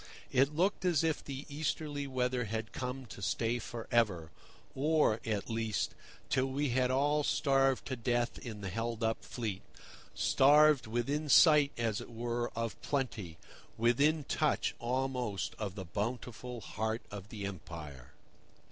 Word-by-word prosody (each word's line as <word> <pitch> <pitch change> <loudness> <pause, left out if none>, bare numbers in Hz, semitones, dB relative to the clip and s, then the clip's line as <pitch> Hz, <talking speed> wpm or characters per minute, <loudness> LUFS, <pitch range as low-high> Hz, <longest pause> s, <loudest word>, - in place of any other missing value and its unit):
It 135 +3 +3
looked 190 +6 +1
as 175 -4 +3
if 160 -2 0
the 140 0 -6
easterly 145 -1 -2
weather 125 -2 0
had 110 +1 -4
come 125 +1 -4
to 100 -3 -10
stay 115 +4 0
for 115 0 -7
ever, 95 -9 +2 0.4
or, 150 -5 +2
at 105 -3 -1
least, 115 -3 -1 0.3
till 130 0 +1
we 140 +2 -1
had 125 +1 +2
all 145 +3 +2
starved 135 -2 +2
to 130 - -3
death 120 0 0
in 110 -4 -7
the 95 - -4
held 115 +2 -3
up 110 0 0
fleet—starved 135 +6 +2
within 140 +7 -1
sight, 150 -2 +7
as 115 -3 0
it - - -9
were, 120 +1 -2
of 115 -1 -3
plenty, 110 - -2 0.4
within 140 +7 +3
touch, - - +1
almost, 120 - -1
of 100 -3 -3
the 95 -3 -6
bountiful 120 +4 -4
heart 110 +2 -3
of 100 0 -8
the 105 -3 -5
Empire. 75 -8 -8
120 Hz, 145 wpm, -33 LUFS, 110-140 Hz, 0.4 s, sight